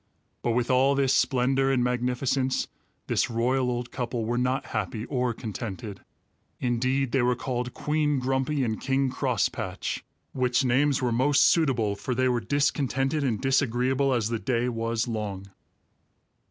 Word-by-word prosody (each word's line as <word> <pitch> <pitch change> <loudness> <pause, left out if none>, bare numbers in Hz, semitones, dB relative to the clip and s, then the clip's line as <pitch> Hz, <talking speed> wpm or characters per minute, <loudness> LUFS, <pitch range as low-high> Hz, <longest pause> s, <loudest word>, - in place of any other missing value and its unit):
But 120 - 0
with 125 +2 0
all 135 +2 +4
this 135 -1 +2
splendor 135 +1 +2
and 125 -2 +2
magnificence, 125 +2 0 0.4
this - - 0
royal 125 +2 +1
old 120 -1 -3
couple 120 -3 -3
were 120 +2 -1
not 125 +1 0
happy 110 -2 -2
or 125 -2 0
contented. 110 -2 -6 0.6
Indeed 130 +2 0
they 135 - +2
were 125 +1 +2
called 125 -1 -3
Queen 150 -1 0
Grumpy 130 +2 0
and 110 -3 -2
King 135 0 +1
Crosspatch, - - -2 0.3
which 125 0 +1
names 135 +2 +2
were 125 - +1
most 140 +5 +3
suitable, 125 -11 +2
for 125 +5 -3
they 130 +1 +2
were 125 -1 +1
discontented 140 +2 0
and 120 -6 0
disagreeable 135 0 +1
as 115 -4 +1
the 115 -1 -2
day 125 -1 0
was 115 0 -1
long. 100 -4 -4
125 Hz, 150 wpm, -26 LUFS, 120-135 Hz, 0.6 s, all